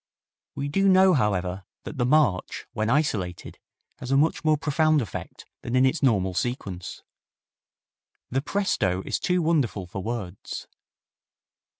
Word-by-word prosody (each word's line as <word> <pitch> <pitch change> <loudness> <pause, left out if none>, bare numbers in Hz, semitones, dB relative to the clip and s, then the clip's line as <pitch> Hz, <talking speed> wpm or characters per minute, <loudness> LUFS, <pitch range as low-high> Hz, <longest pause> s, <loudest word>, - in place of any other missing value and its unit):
We 140 - -3
do 195 +7 +2
know, 190 0 +6
however, 95 -6 0 0.2
that 145 - -8
the 120 - +2
march, 145 -10 +2
when 110 +1 -1
isolated, 110 - -1 0.4
has 125 - -7
a 135 - +3
much 160 +4 +2
more 155 -1 +3
profound 155 0 +2
effect 110 - -6 0.2
than 120 - -3
in 130 +1 +5
its 130 +5 +1
normal 100 -9 +2
sequence. 95 -4 -4 1.3
The 135 +2 +1
presto 95 - 0
is - - -2
too 180 -1 +1
wonderful 140 - +1
for 95 +2 -6
words. 100 -4 -5
130 Hz, 135 wpm, -25 LUFS, 95-155 Hz, 1.3 s, know